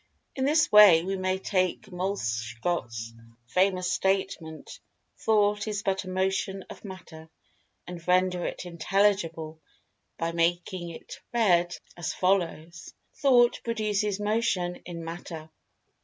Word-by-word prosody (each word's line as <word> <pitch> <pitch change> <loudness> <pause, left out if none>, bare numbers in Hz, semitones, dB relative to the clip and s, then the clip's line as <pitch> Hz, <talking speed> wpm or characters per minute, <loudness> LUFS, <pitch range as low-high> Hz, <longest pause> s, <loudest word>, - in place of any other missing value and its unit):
In 265 - 0
this 300 +2 +3
way, 200 -6 +8
we 195 +2 -2
may 185 0 -1
take 185 -2 -1
Moleschott's 115 - -3 0.3
famous 185 +5 +1
statement: 190 -5 -2 0.4
"Thought 210 -1 +2
is 210 -1 -3
but 195 -1 -1
a - - -7
motion 190 +1 -1
of - - -12
Matter," 175 -5 -10 0.6
and 175 -1 -9
render 180 0 +2
it - - -4
intelligible 170 -2 0 0.6
by 165 0 -1
making 175 +1 -1
it 165 - -10
read 175 -7 +2 0.2
as 175 -3 -4
follows: 170 -3 -1 0.2
"Thought 245 -4 +4
produces 210 -3 -1
Motion 205 -4 0
in 170 -2 -7
Matter." 165 -1 -8
185 Hz, 115 wpm, -27 LUFS, 170-200 Hz, 0.6 s, way